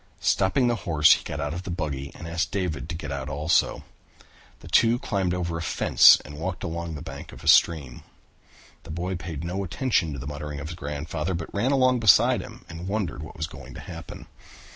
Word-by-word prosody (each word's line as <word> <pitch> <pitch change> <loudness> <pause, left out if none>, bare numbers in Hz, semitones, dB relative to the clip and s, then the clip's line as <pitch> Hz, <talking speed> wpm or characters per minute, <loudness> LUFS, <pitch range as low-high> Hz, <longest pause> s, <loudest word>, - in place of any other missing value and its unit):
Stopping 95 +8 +2
the 120 -1 +1
horse 80 -1 +6
he - - -2
got 75 - -5
out 75 0 -2
of 85 - -4
the 95 - -8
buggy 75 -6 -4
and 85 - -8
asked 85 +1 -1
David 90 -5 -3
to 85 - -3
get 75 -4 -6
out 70 0 -4
also. 75 +3 +1 0.8
The - - -12
two 115 +1 +4
climbed 95 -6 -1
over 85 -2 -2
a - - -4
fence 80 - +6
and 75 +2 -9
walked 90 +2 -4
along 85 -1 -4
the 75 - -7
bank 80 - -9
of - - -12
the - - -9
stream. 70 -7 +4 0.8
The - - -15
boy 90 +4 -3
paid 85 -3 -6
no 90 +3 -3
attention 95 - 0
to - - -6
the 65 - -7
muttering 75 0 -5
of 75 +2 -6
his 85 - -6
grandfather, 75 +3 -3
but 85 -1 -6
ran 115 +7 +1
along 130 -2 +3
beside 105 -6 +5
him - - -12
and 85 +1 -8
wondered 95 - -2
what 75 - -10
was 75 - -2
going 70 -4 -11
to - - -8
happen. 85 -2 -9
85 Hz, 215 wpm, -25 LUFS, 75-95 Hz, 0.8 s, horse